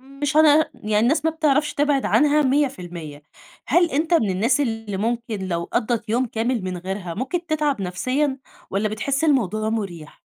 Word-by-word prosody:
مش 275 +3 -4
هنع 310 0 +6
يعني 210 0 -1
الناس 250 +9 +2
ما 320 - +3
بتعرفش 300 -2 +1
تبعد 290 -2 +1
عنها 300 +1 +3
100% 180 - -2 0.4
هل 345 +5 +3
أنت 320 +5 +1
من 220 -12 +3
الناس 220 +10 +1
اللي 225 -6 -2
ممكن 225 -2 -2
لو 170 -1 -2
قضِّت 235 -1 -1
يوم 245 +4 +1
كامل 230 0 -1
من 185 -1 -4
غيرها، 180 -1 -5
ممكن 305 - -3
تتعب 300 - 0
نفسيًا، 255 +10 -1 0.3
والَّا 200 +3 0
بتحس 275 +7 -1
الموضوع 215 - +1
مُريح؟ 185 -9 -5
240 Hz, 160 wpm, -22 LUFS, 200-290 Hz, 0.4 s, هنع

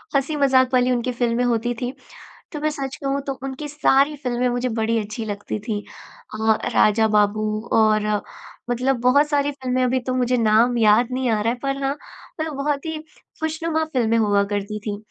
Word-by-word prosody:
हँसी-मजाक 275 -2 +3
वाली 250 0 +3
उनकी 245 0 0
फ़िल्में 240 0 0
होती 240 0 0
थी 245 +1 -2 0.6
तो 300 - -5
मैं 310 - 0
सच 275 -3 -5
कहूँ 275 0 -2
तो 275 - -1
उनकी 270 +2 -5
सारी 295 0 +2
फ़िल्में 250 -3 -1
मुझे 245 +1 -1
बड़ी 225 0 0
अच्छी 215 +1 -4
लगती 205 0 -4
थी। 215 -2 -3 0.5
अ, 220 0 +2 0.2
राजा 220 +1 +4
बाबू 210 0 +2 0.3
और 215 -1 +3 0.6
मतलब 250 +1 0
बहुत 280 +5 +4
सारी 290 -1 +1
फ़िल्में 255 -2 -2
अभी 255 +1 +1
तो 255 +1 -3
मुझे 250 0 +1
नाम 230 +2 +3
याद 225 +2 +4
नहीं 255 -1 -1
आ 215 -2 +1
रहा 230 - +1
है 245 - -7
पर 275 0 -2
हाँ, 275 0 +1 0.5
मतलब 315 -1 -3
बहुत 280 +1 -2
ही 320 -1 -3 0.4
खुशनुमा 320 0 -1
फ़िल्में 230 -3 +2
हुआ 205 -2 +3
करती 205 +1 -3
थी 205 -1 -2
250 Hz, 185 wpm, -22 LUFS, 220-275 Hz, 0.6 s, राजा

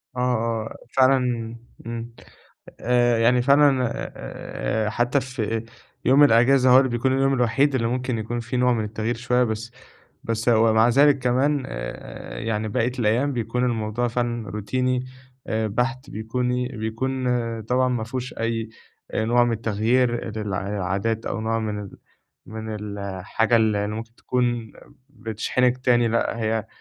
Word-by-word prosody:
آه، - - -4
آه، 115 -3 -1 0.2
فعلًا 125 -4 +2 0.3
امم. 115 0 -5 0.7
آآ، 120 -1 +3
يعني 120 +2 +4
فعلًا 140 -2 +4 0.3
آآ 105 - -3
حتّى 120 +4 +1
في 115 -3 -3 0.4
يوم 135 +4 +6
الأجازة 125 +1 +5
هو 130 - +8
اللي 130 -1 +4
بيكون 120 +2 0
اليوم 135 0 +2
الوحيد 130 +3 +2
اللي 115 -3 +1
ممكن 125 0 -1
يكون 120 +2 -3
فيه 120 +2 -4
نوع 125 0 +3
من 110 -3 0
التغيير 110 +2 -2
شوية، 125 +1 +1
بس 110 +1 -4 0.5
بس 115 +1 -1
ومع 110 0 +5
ذلك 140 +3 +5
كمان 130 +3 +1
آآ - - -7
يعني 110 -1 -2
بقية 120 +2 0
الأيام 120 +6 +1
بيكون 125 +1 -1
الموضوع 115 0 -1
فعلًا 120 -3 -2
روتيني 125 +5 -1 0.4
آآ 110 0 -1
بحت، 130 +5 -2
بيكوني 125 +3 -2
بيكون 130 +3 -3 0.4
طبعًا 125 +3 +1
ما 120 -3 -1
فيهوش 125 +1 -5
أي 115 -1 -2 0.4
آآ، 110 - -1
نوع 120 +1 +4
من 120 - 0
التغيير 115 +3 +1
لل - - -2
للعادات 100 +3 -2
أو 110 - -2
نوع 115 +1 0
من 105 -2 -3
ال 100 - -10 0.5
من 110 0 -6 0.2
الحاجة 100 +4 0
اللي 105 -2 +2
اللي 105 +1 -3
ممكن 115 +1 -8
تكون 120 -3 -1 0.4
بتشحنِك 120 +2 0
تاني، 120 -2 +3
لأ 115 0 0
هي 110 -1 -1
120 Hz, 150 wpm, -23 LUFS, 110-125 Hz, 0.7 s, هو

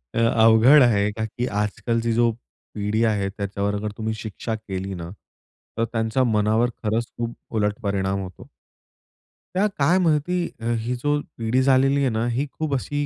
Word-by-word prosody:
अवघड 115 +4 +6
आहे 105 -4 +3
का, 110 +1 -3
की 120 +3 -4
आजकालची 115 +2 -1
जो 120 0 +3 0.4
पिढी 105 +2 0
आहे 105 -3 0
त्याच्यावर 100 0 -3
अगर 105 +1 -3
तुम्ही 110 0 -2
शिक्षा 110 +1 -5
केली 95 -3 -5
ना, 85 -2 -6 0.7
तर 115 - +1
त्यांच्या 115 +3 0
मनावर 110 +1 +2
खरंच 110 +2 0
खूप 120 0 -3 0.2
उलट 105 0 0
परिणाम 100 -1 -1
होतो. 95 -1 -10 1.1
त्या 195 +3 +3
काय 160 +6 +3
माहिती 175 +1 +1 0.4
ही 120 +3 -2
जो 145 +4 0 0.2
पिढी 115 +3 +1
झालेली 135 +1 +3
आहे, 135 - +2
ना 110 0 -1
ही 130 +5 0
खूप 155 -2 -3
अशी 145 +2 -2
110 Hz, 155 wpm, -23 LUFS, 105-125 Hz, 1.1 s, अवघड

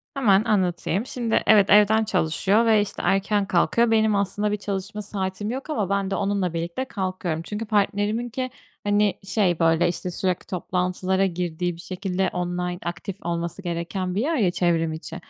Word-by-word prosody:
Hemen 210 -7 +4
anlatayım. 190 -1 0
Şimdi, 240 -3 0
evet, 205 -2 +6
evden 210 +2 +6
çalışıyor 200 +3 +2
ve, 220 -2 +5
işte, 205 - -4
erken 200 +1 +2
kalkıyor. 225 +6 +2
Benim, 220 -1 +3
aslında 200 +1 0
bir 210 - 0
çalışma 200 +1 -4
saatim 195 0 -4
yok, 265 +5 -5
ama 215 - -1
ben 200 -1 0
de, - - +1
onunla 200 -3 0
birlikte 170 +9 -3
kalkıyorum. 185 -7 -3
Çünkü 210 +6 -5
partneriminki, 215 +4 0 0.3
hani, 205 0 +2
şey 190 -3 +1
böyle, 165 0 +3
işte, 180 +1 -3
sürekli 185 0 -2
toplantılara 185 +1 0
girdiği, 175 -1 -2
bir 170 - -11
şekilde 190 0 -2
online, 180 0 -2
aktif 175 +2 -4
olması 170 +2 -3
gereken 180 +1 -3
bir 205 - +1
yer 315 +6 0
ya: 195 -9 +2
çevrim 165 -3 +1
içi. 160 +1 -7
195 Hz, 165 wpm, -24 LUFS, 175-210 Hz, 0.3 s, evet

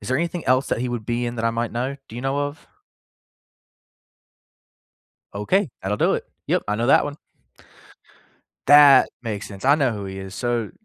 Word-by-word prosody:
Is - - -8
there 130 - +1
anything 170 +1 -3
else 130 +1 +2
that - - -1
he 125 - -2
would 120 -3 -5
be 120 0 -1
in 120 0 -5
that 115 - -3
I 115 - +2
might 115 0 -3
know, 130 +4 -3
do 115 - -10
you 120 - -6
know 135 +1 -1
of? 145 +1 -4 2.7
Okay, 145 - 0
that'll 100 +2 -2
do - - +2
it, - - -3 0.2
yep, - - +1
I 105 - 0
know 120 +3 -1
that - - +5
one. 145 0 -6 1.5
That 145 -2 +8
makes 110 -3 -5
sense, 100 +1 -11
I 140 +2 +6
know 140 -5 +1
who 105 -2 -6
he 95 0 -7
is, 95 0 -8
so 120 -3 -2
120 Hz, 195 wpm, -22 LUFS, 110-140 Hz, 2.7 s, That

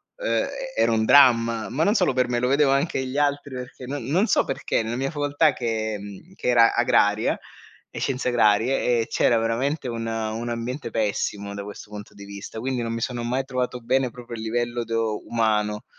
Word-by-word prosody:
uhm, - - 0 0.3
era - - +3
un 110 -1 +2
dramma, 115 -4 +5
ma 150 +5 0
non 205 - +3
solo - - +2
per 125 0 +1
me, 120 0 0
lo 125 - +1
vedevo 140 +1 +3
anche 140 +5 +1
negli 130 +1 -3
altri 145 -1 0
perché 125 0 -8
non 140 +3 -5
non 175 +9 +2
so - - +2
perché, 135 - -1
nella 110 +1 -3
mia 135 +2 -2
facoltà, 145 0 +2
che 110 -3 -2
mhmm, 100 - -11
che 190 - -6
era 115 -2 +5
agraria 110 -3 +2 0.5
e - - -7
scienze 130 -1 -2
agrarie, 120 +1 +3
ehm, - - +2
c'era 120 - +2
veramente 130 +6 -1
un 115 -1 -4
un 115 +1 -3
ambiente 120 +3 -4
pessimo 100 -2 -2
da 100 - -5
questo 105 0 -10
punto 105 0 -9
di 100 0 -11
vista, 100 +2 -8
quindi 130 +1 -2
non 115 - -3
mi 115 - -3
sono 120 -1 -3
mai 125 +3 -1
trovato 125 -1 -2
bene 130 +1 0
proprio 120 0 -10
a - - -3
livello 120 +2 -2
do 115 -1 -2
umano. 105 -2 0
120 Hz, 205 wpm, -24 LUFS, 110-130 Hz, 0.5 s, dramma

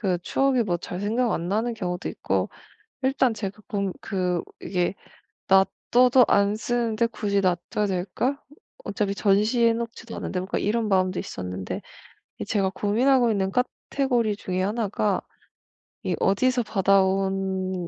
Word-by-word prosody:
그 190 -5 +1
추억이 270 +1 +2
뭐 175 -5 0
잘 180 +1 -6
생각 230 +4 +1
안 170 +1 -2
나는 225 +4 0
경우도 180 -4 -3
있고, - - -1 0.5
일단 260 -2 +2
제가 200 0 -6
그럼 200 -4 -1
그 180 -3 -1 0.2
이게 180 0 -1 0.5
'놔둬도 245 +6 +4
안 200 +1 +3
쓰는데 235 0 0
굳이 200 -3 -1
놔둬야 180 +3 0
될까? 200 +9 -1 0.4
어차피 200 0 -1
전시해 215 +4 +3
놓지도 230 0 -6
않은데.' 185 - -3
뭐 185 - -5
그니까 - - -1
이런 225 0 +1
마음도 185 -1 +2
있었는데 90 0 -5 0.6
이 - - -3
제가 195 -3 0
고민하고 240 +4 +3
있는 195 -2 0
카테고리 250 -2 0
중에 185 -2 -3
하나가 205 -2 0 0.8
이 - - -1
어디서 245 +5 +2
받아온 190 -2 +1
205 Hz, 300 characters per minute, -25 LUFS, 190-235 Hz, 0.8 s, 놔둬도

